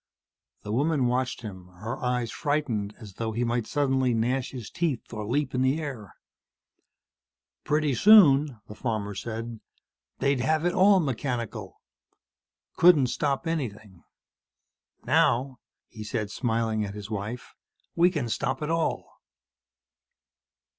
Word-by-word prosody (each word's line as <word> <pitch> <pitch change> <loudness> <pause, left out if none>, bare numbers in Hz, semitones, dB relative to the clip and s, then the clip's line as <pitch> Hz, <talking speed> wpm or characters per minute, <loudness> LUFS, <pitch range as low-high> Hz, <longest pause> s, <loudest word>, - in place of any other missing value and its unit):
The 105 - -5
woman 140 +3 +1
watched 125 0 -1
him, 95 -4 -8
her 110 +6 -5
eyes 125 -2 -1
frightened 125 -9 -2
as 105 -5 -11
though 110 -1 -2
he 120 +3 -1
might 120 -1 -1
suddenly 130 -4 +1
gnash 125 +3 0
his 125 -5 -8
teeth 160 -10 -2
or 105 -2 -5
leap 145 +5 -1
in 125 - 0
the 130 +4 +2
air. 130 - -7 1.5
"Pretty 150 -1 +1
soon," 145 - +6
the - - -9
farmer 105 -3 -3
said, 115 +3 -6 0.6
"they'd 140 -1 +1
have 155 +6 +1
it 175 - +2
all 195 +1 +5
mechanical. 125 - -4 0.9
Couldn't 150 -8 +6
stop 140 +2 -1
anything. 110 - -4 1.0
Now," 130 +2 +2 0.3
he 110 -2 -9
said, 105 -1 -3
smiling 115 -2 -1
at 100 0 -5
his 105 +1 -8
wife, 110 +4 -5 0.4
"we 175 +1 +5
can 150 -9 -2
stop 135 +7 -2
it 150 - -2
all." 165 -1 -1
125 Hz, 130 wpm, -27 LUFS, 110-145 Hz, 1.5 s, soon